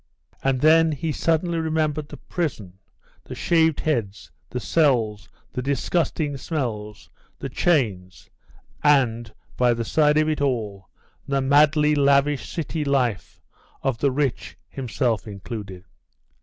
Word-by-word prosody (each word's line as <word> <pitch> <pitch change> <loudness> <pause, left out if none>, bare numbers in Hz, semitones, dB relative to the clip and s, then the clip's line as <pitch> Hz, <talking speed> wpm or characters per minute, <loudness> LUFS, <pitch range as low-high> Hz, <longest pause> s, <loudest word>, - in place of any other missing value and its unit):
And 135 -1 +1
then 160 +1 +5
he 155 +2 -3
suddenly 165 +2 0
remembered 155 -2 -1
the - - -9
prison, 110 - -4 0.4
the - - -8
shaved 160 -3 +2
heads, 105 - -2 0.2
the 125 - -4
cells, 120 -10 +1 0.2
the 125 - -2
disgusting 145 +2 -1
smells, 110 - -4 0.3
the - - -6
chains, 100 - 0 0.6
and, 120 -6 +2 0.3
by 120 -1 +3
the 115 0 -3
side 150 +5 +3
of 155 0 +3
it 155 -2 -1
all, 105 -8 -2 0.4
the 140 0 +1
madly 150 +2 +4
lavish 140 0 +2
city 160 -2 -3
lift 130 -7 -1 0.4
of 130 -4 -1
the 140 - +2
rich, 135 -1 -2
himself 120 -3 -2
included. 100 -2 -7
140 Hz, 125 wpm, -23 LUFS, 115-155 Hz, 0.6 s, then